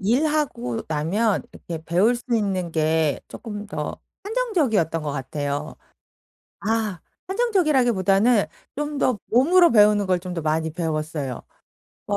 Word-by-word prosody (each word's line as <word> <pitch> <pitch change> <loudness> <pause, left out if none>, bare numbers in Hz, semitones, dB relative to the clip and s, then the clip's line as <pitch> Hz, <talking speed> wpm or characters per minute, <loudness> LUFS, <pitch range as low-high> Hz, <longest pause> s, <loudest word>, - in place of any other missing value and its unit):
일하고 245 - 0
나면 185 +8 0
이렇게 165 -2 -7
배울 185 +9 +3
수 240 - -11
있는 190 -5 0
게 160 -2 +1
쪼끔 210 -2 -7
더 - - -5 0.2
한정적이었던 310 - 0
것 150 -2 -3
같아요. 145 +2 -4 0.8
아 215 -4 -1 0.3
한정적이라기보다는 250 - +3 0.3
좀 295 0 -3
더 255 -5 +1
몸으로 340 +10 +5
배우는 210 -2 +5
걸 185 -1 +1
좀 180 0 -6
더 170 - -3
많이 160 +1 0
배웠어요. 155 -5 -3 0.7
어 - - 0
200 Hz, 270 characters per minute, -23 LUFS, 160-245 Hz, 0.8 s, 몸으로